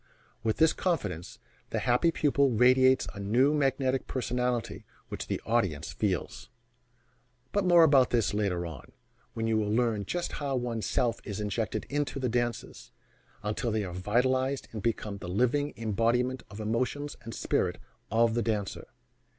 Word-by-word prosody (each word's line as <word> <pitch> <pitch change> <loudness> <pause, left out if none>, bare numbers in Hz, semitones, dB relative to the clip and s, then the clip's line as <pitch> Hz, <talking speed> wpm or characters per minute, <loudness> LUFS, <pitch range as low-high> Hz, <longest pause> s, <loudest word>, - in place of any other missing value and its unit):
With 110 -1 0
this 160 0 +5
confidence, 100 - -2 0.3
the - - -2
happy 125 +7 +3
pupil 140 -3 +2
radiates 130 +2 +5
a 100 - -9
new 120 +9 +3
magnetic 135 -2 +1
personality 125 -2 -2 0.3
which - - -5
the - - -2
audience 95 -10 0
feels 90 - -2 1.0
but 205 -1 +1
more 175 -2 +7
about 140 -5 +5
this 115 -4 +1
later 95 -4 0
on, 75 -6 -9 0.4
when 115 - -2
you 110 -1 +2
will 105 -1 -1
learn 110 -2 +1
just 175 - -2
how 140 -2 -1
one's 120 -4 -2
self 120 -2 0
is 100 -1 -5
injected 105 +1 -2
into 145 0 -2
the 130 -2 0
dances, 120 -1 -3 0.5
until 105 +3 -1
they 110 -1 0
are 90 -3 -6
vitalized 130 +8 0
and 110 - -5
become 105 -2 -2
the 90 - -7
living 125 +9 +1
embodiment 115 +4 0
of 105 - -10
the 110 - -5
emotions 130 +6 -2
and 115 -1 -8
spirit - - 0 0.3
of 115 +1 +3
the 120 - +1
dancer. 105 -4 -2
120 Hz, 160 wpm, -29 LUFS, 105-130 Hz, 1.0 s, more